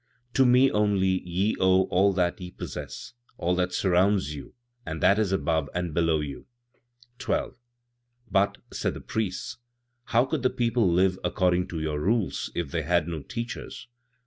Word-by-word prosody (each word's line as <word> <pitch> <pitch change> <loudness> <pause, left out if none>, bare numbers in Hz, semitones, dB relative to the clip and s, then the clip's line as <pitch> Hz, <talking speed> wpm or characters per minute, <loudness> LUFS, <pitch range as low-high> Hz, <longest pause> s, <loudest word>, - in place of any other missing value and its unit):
"To 130 -1 +4
me 125 +2 +5
only 100 -3 +2
ye 95 +5 +1
owe 95 0 +4
all 95 +3 +4
that 90 -1 0
ye 90 - -6
possess, - - -7 0.2
all 90 +2 0
that 90 0 0
surrounds 90 -3 +2
you 70 - -10 0.3
and 80 -5 -5
that 100 +6 +4
is 105 -3 +1
above 80 -5 0
and 90 -2 -2
below 80 -1 +2
you.'" 70 -2 -7 0.7
12. 130 - -1 0.8
"But," 100 +1 +2 0.2
said - - -2
the - - -6
priests, 110 +3 -3 0.5
"how 120 +2 +3
could 145 +2 -2
the 130 - +3
people 115 -6 +1
live 95 +2 +2
according 90 0 +1
to 85 - -5
your 75 -1 -2
rules 105 +4 0
if 85 -5 -3
they 85 - -1
had 85 +1 +1
no 80 -3 -4
teachers?" 115 - -6
95 Hz, 165 wpm, -26 LUFS, 85-105 Hz, 0.8 s, me